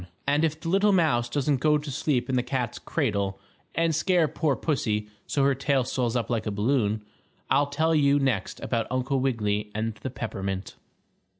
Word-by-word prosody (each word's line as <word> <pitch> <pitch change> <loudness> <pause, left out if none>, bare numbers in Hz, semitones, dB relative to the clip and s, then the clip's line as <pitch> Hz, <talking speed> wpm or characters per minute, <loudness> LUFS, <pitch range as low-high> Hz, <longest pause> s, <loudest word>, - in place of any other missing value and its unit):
] - - -39
And 145 +2 +3
if 160 -1 0
the 165 - -7
little 195 +4 +4
mouse 150 -11 +2
doesn't 140 +1 +1
go 150 +1 +4
to 150 -1 -6
sleep 125 -2 0
in 130 - 0
the 125 - +3
cat's 125 -2 -3
cradle 100 -1 -1 0.4
and 165 -1 +2
scare 175 +1 +3
poor 150 -1 0
pussy 110 -9 -1 0.2
so 140 - +1
her 140 0 +4
tail 135 0 +1
swells 125 -1 -1
up 120 - 0
like 115 -3 -1
a - - 0
balloon, 105 0 +1 0.5
I'll 140 +1 +4
tell 155 +3 +1
you 145 -2 +4
next 130 -8 -1
about 115 -2 -1
Uncle 130 +2 0
Wiggily 105 -5 0
and 110 +1 -1
the 130 - -6
peppermint. 100 -6 -4
130 Hz, 190 wpm, -26 LUFS, 115-150 Hz, 0.5 s, little